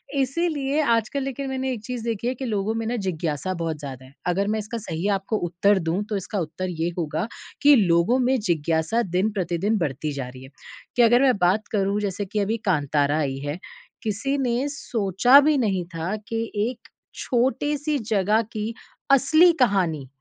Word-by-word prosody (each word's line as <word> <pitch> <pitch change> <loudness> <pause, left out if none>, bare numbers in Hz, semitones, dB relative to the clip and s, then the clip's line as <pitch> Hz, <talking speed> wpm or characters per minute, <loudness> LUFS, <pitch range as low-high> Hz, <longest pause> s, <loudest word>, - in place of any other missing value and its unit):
इसीलिए 280 +1 0
आजकल 235 +1 +1
लेकिन 270 0 -4
मैंने 265 0 -2
एक 230 - -6
चीज़ 245 0 -5
देखी 230 0 -2
है 250 - +1
कि 265 - -5
लोगों 215 -2 -1
में 225 0 -2
ना 240 - -1
जिज्ञासा 165 0 -2
बहुत 165 -3 -3
ज़्यादा 135 -3 -8
है। 130 - -17
अगर 195 +3 +1
मैं 220 - 0
इसका 215 +3 -5
सही 175 -3 -3
आपको 195 +3 -2
उत्तर 190 +4 +2
दूँ 170 +4 -1
तो 210 - -1
इसका 195 +2 -4
उत्तर 170 +3 -4
ये 165 -1 -2
होगा, 160 +2 -2 0.3
कि 290 0 +7
लोगों 190 +3 +3
में 255 +1 +2
जिज्ञासा 165 +2 0
दिन-प्रतिदिन 195 +1 0
बढ़ती 150 -1 -2
जा 135 -3 -4
रही 130 +1 -12
है, 130 - -12 0.5
कि 245 - +4
अगर 240 +2 +5
मैं 260 -5 +4
बात 190 +4 +2
करूँ 200 -1 +1
जैसे 200 0 -2
कि 205 +2 -3
अभी 210 +3 0
कांतारा 145 -3 +2
आई 135 -3 -1
है। 145 +5 -3 0.4
किसी 230 +6 -1
ने 255 0 0
सोचा 240 -2 +4
भी 300 - +3
नहीं 200 -8 0
था 165 +5 -2
कि 225 0 -2 0.3
एक 245 -2 -11 0.3
छोटी-सी 285 +5 0 0.2
जगह 210 +2 +3
की 215 +1 -3 0.4
असली 315 +6 +6
कहानी 180 - +2
205 Hz, 180 wpm, -24 LUFS, 170-245 Hz, 0.5 s, कि